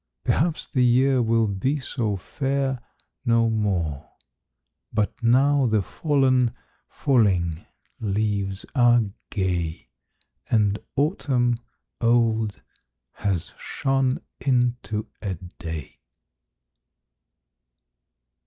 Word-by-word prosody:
Perhaps 160 Hz, +2 st, +1 dB
the 130 Hz, -4 st, +1 dB
year 130 Hz, +2 st, +4 dB
will 115 Hz, -1 st, +2 dB
be 115 Hz, +9 st, 0 dB
so 115 Hz, -6 st, -2 dB
fair 135 Hz, +5 st, -1 dB, 0.4 s
no 115 Hz, -1 st, +3 dB
more, 90 Hz, -10 st, -1 dB, 0.8 s
But 105 Hz, +2 st, -1 dB
now 135 Hz, +3 st, +4 dB
the 110 Hz, -3 st, +2 dB
fallen, 130 Hz, -, +2 dB, 0.3 s
falling 95 Hz, -, +1 dB, 0.3 s
leaves 100 Hz, -2 st, -1 dB
are 120 Hz, -3 st, +5 dB, 0.3 s
gay, 90 Hz, -5 st, -2 dB, 0.6 s
And 105 Hz, -2 st, +2 dB, 0.2 s
autumn 130 Hz, -, +1 dB, 0.4 s
old 115 Hz, -3 st, +2 dB, 0.5 s
has 95 Hz, -6 st, -2 dB
shone 135 Hz, -1 st, 0 dB, 0.2 s
into 125 Hz, -4 st, 0 dB, 0.2 s
a 95 Hz, -3 st, -2 dB
Day! 80 Hz, -3 st, -8 dB
115 Hz, 80 wpm, -24 LUFS, 100-130 Hz, 0.8 s, are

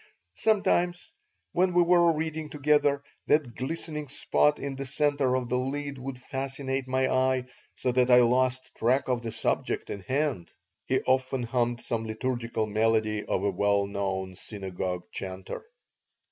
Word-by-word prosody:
Sometimes, 180 Hz, -5 st, +1 dB, 0.4 s
when 180 Hz, +1 st, +2 dB
we 175 Hz, -, +6 dB
were 170 Hz, -1 st, +5 dB
reading 160 Hz, 0 st, -3 dB
together, 145 Hz, -1 st, +2 dB, 0.2 s
that 145 Hz, -6 st, +2 dB
glistening 150 Hz, +3 st, -4 dB
spot 150 Hz, +1 st, +2 dB
in 140 Hz, -1 st, -4 dB
the 135 Hz, -, -4 dB
center 140 Hz, -2 st, +1 dB
of 130 Hz, -2 st, -1 dB
the 125 Hz, +1 st, +1 dB
lid 140 Hz, +1 st, -3 dB
would 130 Hz, 0 st, -5 dB
fascinate 135 Hz, +1 st, -3 dB
my 130 Hz, 0 st, +2 dB
eye 130 Hz, -1 st, +2 dB, 0.3 s
so 125 Hz, -, 0 dB
that 125 Hz, 0 st, +3 dB
I 125 Hz, 0 st, +8 dB
lost 130 Hz, +1 st, +1 dB
track 125 Hz, +4 st, +1 dB
of 125 Hz, -2 st, +1 dB
the 115 Hz, -1 st, -4 dB
subject 115 Hz, -, -1 dB
in 100 Hz, -, -4 dB
hand 130 Hz, -, -1 dB, 0.4 s
He 130 Hz, -, +2 dB
often 130 Hz, 0 st, +1 dB
hummed 120 Hz, 0 st, 0 dB
some 115 Hz, -1 st, -2 dB
liturgical 115 Hz, 0 st, -2 dB
melody 110 Hz, 0 st, +1 dB
of 95 Hz, -, -1 dB
a 100 Hz, -, +2 dB
well 100 Hz, +1 st, +2 dB
known 95 Hz, -2 st, -3 dB
synagogue 95 Hz, -3 st, -4 dB
chanter. 95 Hz, -1 st, -6 dB
130 Hz, 150 wpm, -28 LUFS, 115-145 Hz, 0.4 s, I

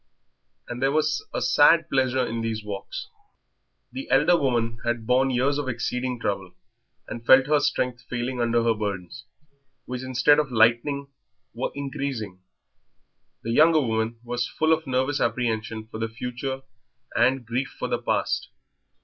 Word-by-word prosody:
And 120 Hz, +1 st, -6 dB
there 135 Hz, +1 st, +3 dB
was 155 Hz, +1 st, +1 dB
a -, -, -3 dB
sad 150 Hz, +6 st, +5 dB
pleasure 130 Hz, -3 st, +1 dB
in 115 Hz, -1 st, -3 dB
these 110 Hz, -1 st, -3 dB
walks. 100 Hz, -2 st, -6 dB, 0.8 s
The 270 Hz, +2 st, -7 dB
elder 175 Hz, -, +5 dB
woman 120 Hz, -6 st, 0 dB
had 120 Hz, -1 st, -2 dB
borne 130 Hz, +3 st, +3 dB
years 135 Hz, +3 st, +1 dB
of 140 Hz, -3 st, -3 dB
exceeding 125 Hz, +1 st, -2 dB
trouble, 95 Hz, -4 st, -3 dB, 0.5 s
and 115 Hz, -, -7 dB
felt 130 Hz, +2 st, +7 dB
her 150 Hz, +1 st, +3 dB
strength 125 Hz, -3 st, -1 dB
failing 125 Hz, 0 st, -2 dB
under 115 Hz, 0 st, +2 dB
her 115 Hz, 0 st, +3 dB
burdens, 95 Hz, -, -5 dB, 0.6 s
which 125 Hz, 0 st, -5 dB
instead 130 Hz, +3 st, +3 dB
of 145 Hz, -3 st, -1 dB
lightening 120 Hz, +5 st, +2 dB, 0.4 s
were 120 Hz, -, -2 dB
increasing; 135 Hz, -8 st, -4 dB, 1.0 s
the 115 Hz, -, -3 dB
younger 155 Hz, +5 st, +5 dB
woman 115 Hz, -3 st, -1 dB
was 120 Hz, 0 st, -2 dB
full 160 Hz, 0 st, +2 dB
of 160 Hz, -1 st, -2 dB
nervous 130 Hz, +2 st, 0 dB
apprehension 110 Hz, -2 st, -1 dB
for 110 Hz, 0 st, -9 dB
the 115 Hz, 0 st, -2 dB
future 125 Hz, +3 st, -5 dB, 0.5 s
and 130 Hz, -1 st, +2 dB
grief 125 Hz, +4 st, -3 dB
for -, -, -3 dB
the -, -, -2 dB
past. -, -, -1 dB
125 Hz, 150 wpm, -25 LUFS, 115-135 Hz, 1.0 s, felt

